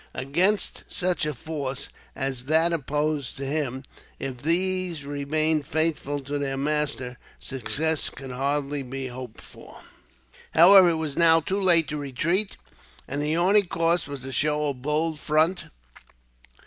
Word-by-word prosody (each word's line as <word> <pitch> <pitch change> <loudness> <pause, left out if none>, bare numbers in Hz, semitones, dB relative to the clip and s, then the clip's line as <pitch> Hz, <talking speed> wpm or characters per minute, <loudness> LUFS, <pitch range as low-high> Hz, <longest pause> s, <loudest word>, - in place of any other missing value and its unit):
Against 175 +11 0
such 180 -4 0
a 150 - -2
force 140 -1 -5 0.3
as 130 -2 -3
that 160 +3 +3
opposed 150 -2 -1
to 135 - -4
him, 135 -2 -2 0.3
if 130 -2 -6
these 175 -1 0
remained 145 +1 0
faithful 155 -3 0
to 145 +2 -4
their 135 -1 -2
master, 140 -4 -2 0.2
success 150 +4 -1
could 135 -1 -9
hardly 140 +2 -1
be 135 0 -5
hoped 125 -2 -9
for. - - -14 0.7
However, 185 +2 +8
it 165 - +1
was 155 -3 -4
now 165 -1 +6
too 190 +5 -2
late 170 -4 +4
to 150 - -3
retreat, 160 +9 -1 0.5
and 140 +2 -3
the 150 +2 0
only 195 +4 +4
course 170 -3 0
was 140 -3 -7
to 135 - -6
show 150 +2 +1
a - - -1
bold 150 +4 -1
front. 160 +5 +1
150 Hz, 145 wpm, -25 LUFS, 135-165 Hz, 0.7 s, However